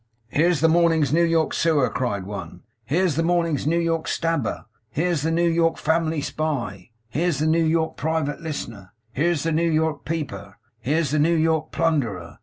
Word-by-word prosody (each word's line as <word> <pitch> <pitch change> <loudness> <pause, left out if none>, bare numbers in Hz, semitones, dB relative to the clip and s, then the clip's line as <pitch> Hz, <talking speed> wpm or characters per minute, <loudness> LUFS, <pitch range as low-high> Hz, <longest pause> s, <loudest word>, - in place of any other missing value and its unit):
'Here's 165 +2 +2
this 160 0 +4
morning's 165 -4 +3
New 170 - +4
York 165 -2 +2
Sewer!' 155 -6 +2
cried 100 -7 -2
one. 100 +1 -8 0.2
'Here's 160 +4 +1
this 165 - +2
morning's 165 -4 +1
New 165 +2 +2
York 165 -1 0
Stabber! 165 -9 -1 0.2
Here's 165 +5 0
the 160 - 0
New 170 +1 +2
York 165 0 +2
Family 160 -1 0
Spy! 120 - -3 0.2
Here's 165 +5 0
the 155 - 0
New 165 +1 +3
York 160 0 0
Private 160 -1 -1
Listener! 115 - -6 0.2
Here's 155 +2 0
the 165 - 0
New 165 +2 +1
York 155 -2 0
Peeper! 105 - -5 0.2
Here's 145 +4 0
the 155 - +1
New 165 +3 +3
York 160 -1 +1
Plunderer! 120 - -1
160 Hz, 175 wpm, -23 LUFS, 140-165 Hz, 0.2 s, this